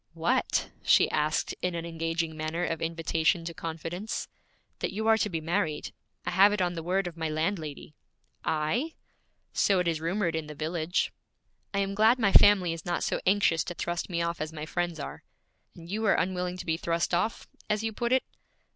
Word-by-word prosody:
'What?' - - +1
she - - +5
asked 155 +1 0
in 180 -1 -1
an 165 0 -3
engaging 165 -1 -2
manner 155 +3 -2
of 165 -2 -2
invitation 165 +1 +1
to 170 - -4
confidence. 165 +6 -4 0.5
'That - - -1
you 220 +3 -3
are 225 0 +6
to 210 - +1
be 165 -4 -2
married. 165 -1 -1 0.3
I - - -1
have 195 +3 +6
it 210 - -1
on 180 -1 +1
the 165 - -4
word 185 +3 0
of 175 -1 -6
my 160 -1 -1
landlady.' 155 -2 -3 0.5
'I?' 195 - 0 0.6
'So 195 - +3
it 180 -1 +1
is 160 -2 0
rumored 170 0 0
in 160 -1 -3
the 150 - -8
village.' 160 +3 -1 0.6
'I - - +2
am 195 0 -1
glad 220 +4 +5
my 220 -5 +2
family 190 -5 +7
is 165 -1 -7
not 175 - -1
so - - -1
anxious 185 -5 +4
to 175 - -5
thrust 175 +2 -3
me 170 -2 0
off 170 -1 -2
as 155 +1 -3
my 155 -1 -6
friends 175 0 -2
are.' 140 - -6 0.5
'And 165 -1 -11
you 210 +5 -2
are 210 - +5
unwilling 180 0 -1
to - - -6
be 160 -1 0
thrust 170 +1 -1
off, 180 +6 0 0.2
as 210 +1 +1
you 225 0 -1
put 235 +2 -1
it?' 260 0 +4
170 Hz, 200 wpm, -29 LUFS, 160-195 Hz, 0.6 s, family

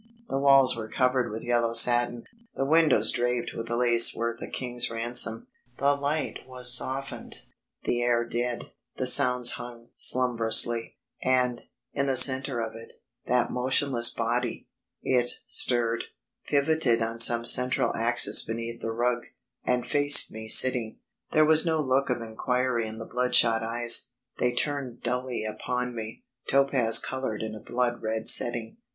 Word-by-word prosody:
The 135 - -3
walls 135 -2 +3
were 110 -1 -7
covered 130 -1 -1
with 110 +1 -8
yellow 120 -1 -1
satin, 120 0 +4 0.3
the 135 - -3
windows 150 -7 +2
draped 120 0 -3
with 115 0 -8
lace 120 0 +4
worth 115 0 -5
a - - -7
king's 125 -1 -3
ransom, 115 -1 0 0.3
the 140 +1 +1
light 145 +2 -4
was 125 -1 +2
softened, 135 +2 -6 0.5
the 120 - -2
air 120 -1 0
dead, 120 +1 -5 0.2
the 130 - -3
sounds 125 -1 +6
hung 120 -1 -9
slumbrously. 120 -2 +2 0.3
And, 125 -2 -1 0.3
in 140 0 -2
the 135 -1 -1
centre 130 0 +2
of 110 -1 -6
it, 115 0 -13 0.3
that 125 0 -1
motionless 125 -1 +2
body. 120 +1 -4 0.4
It 125 -2 0 0.2
stirred, 115 -2 +2 0.4
pivoted 140 -5 0
on 115 +1 -6
some 115 0 +5
central 125 +2 +2
axis 120 +2 +3
beneath 115 +1 -7
the 115 - -5
rug, 120 +1 -3 0.4
and 125 -1 -2
faced 145 0 +3
me 110 0 -10
sitting. 120 -1 +2 0.3
There 155 -1 +2
was 155 0 +4
no 160 -2 -1
look 135 -1 -1
of 120 -2 -3
inquiry 120 +1 -3
in 110 0 -9
the 115 - -9
bloodshot 125 -2 +2
eyes 120 +2 +2 0.3
they 125 - 0
turned 130 -1 -3
dully 125 -1 -4
upon 125 +3 -5
me, 110 -1 -9 0.3
topaz 135 -4 +3
coloured 130 -5 -4
in 110 -1 -7
a 110 - -10
blood 120 +1 -3
red 110 0 -5
setting. 120 - +2
120 Hz, 150 wpm, -25 LUFS, 115-130 Hz, 0.5 s, sounds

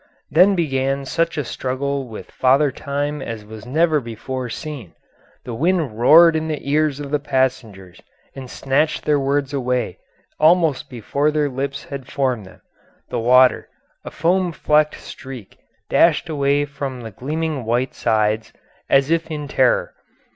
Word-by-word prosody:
Then 185 +6 +5
began 135 -4 -1
such 165 +4 -1
a 150 - 0
struggle 135 +2 -3
with 110 -2 -10
Father 135 +2 +3
Time 145 +2 -3
as 115 -4 -6
was 110 +1 -11
never 155 +3 +2
before 125 +1 -6
seen; 130 - -7 0.5
the 120 - -5
wind 155 -4 0
roared 165 +6 +7
in 160 0 -1
the 155 -1 -2
ears 150 -1 +1
of 140 -1 -6
the 150 - +1
passengers 125 -10 -2 0.3
and 130 -2 -8
snatched 140 +5 0
their 150 -1 +3
words 140 0 -1
away 125 -2 -2 0.4
almost 160 -3 +3
before 140 +5 -1
their 150 -1 0
lips 140 +1 -4
had 140 -2 -8
formed 125 -7 -1
them; - - -17 0.5
the - - -2
water, 125 +2 +4 0.3
a - - -7
foam 175 +3 +1
flecked 150 -1 +2
streak, 130 -7 -10 0.3
dashed 170 0 +3
away 145 -1 +1
from 140 -3 -6
the 115 -1 -8
gleaming 150 +4 -3
white 120 +3 -1
sides 110 -1 0 0.4
as 135 +2 +3
if 165 0 0
in 150 -2 -5
terror. 130 -3 +1
140 Hz, 150 wpm, -20 LUFS, 125-150 Hz, 0.5 s, roared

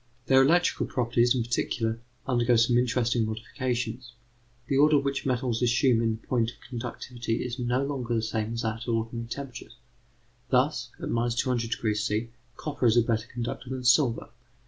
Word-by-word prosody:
Their 130 +2 +6
electrical 170 +6 +3
properties, 120 0 +2
in 120 - +1
particular, 115 -1 -1 0.3
undergo 120 -2 +2
some 120 +1 +4
interesting 120 -1 +2
modifications. 120 +2 -3 0.5
The 135 - -1
order 150 +2 +5
which 140 -1 -1
metals 125 -2 0
assume 120 0 +3
in 115 -1 0
point 115 0 0
of 120 - -11
conductivity 120 -1 -4
is 125 0 -5
no 125 +2 0
longer 125 -4 -2
the 110 - 0
same 110 0 -2
as 115 0 -3
at 115 +2 -3
ordinary 115 0 -2
temperatures. 125 -1 -7 0.7
Thus 125 -2 +1
at - - -5
200° 115 -2 0
C. 110 +2 -1 0.3
copper 145 -5 -1
is 115 +1 +4
a 120 - +6
better 115 0 -1
conductor 120 +1 -5
than 130 -1 -4
silver. 125 -2 +3
120 Hz, 155 wpm, -27 LUFS, 115-125 Hz, 0.7 s, Their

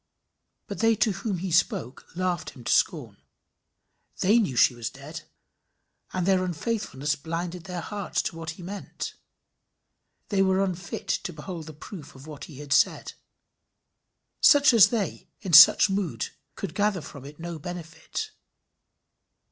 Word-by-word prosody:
But - - -7
they 225 0 +4
to 215 0 +2
whom 195 0 -3
he 185 +1 -4
spoke 180 - 0
laughed 180 -2 -2
him 125 - -12
to - - +1
scorn. - - 0 1.0
They 210 +5 +5
knew 170 - -1
she 120 - +5
was 120 -2 -5
dead, - - -9 0.9
and 185 -2 -1
their 190 -1 +3
unfaithfulness 175 - -2
blinded 165 +3 -5
their 180 -2 -5
hearts 205 +2 -3
to - - -4
what 165 -1 -6
he 180 - -10
meant. 195 +3 -6 1.2
They 200 -2 +2
were 190 0 +3
unfit 180 -2 -5
to - - -1
behold 165 +1 -7
the 155 - -8
proof 155 +1 -11
of 135 +1 -13
what 150 -2 -9
he 150 - -12
had 145 -1 -2
said. - - +2 1.3
Such 285 -2 +6
as 225 -5 +8
they, 220 -5 -3
in 185 -5 -5
such 160 +6 +10
mood, 195 -4 -2 0.3
could 195 - -5
gather 205 -3 +1
from 140 -2 -10
it 145 +3 -12
no 170 -1 -6
benefit. 175 - -6
180 Hz, 150 wpm, -26 LUFS, 155-200 Hz, 1.3 s, such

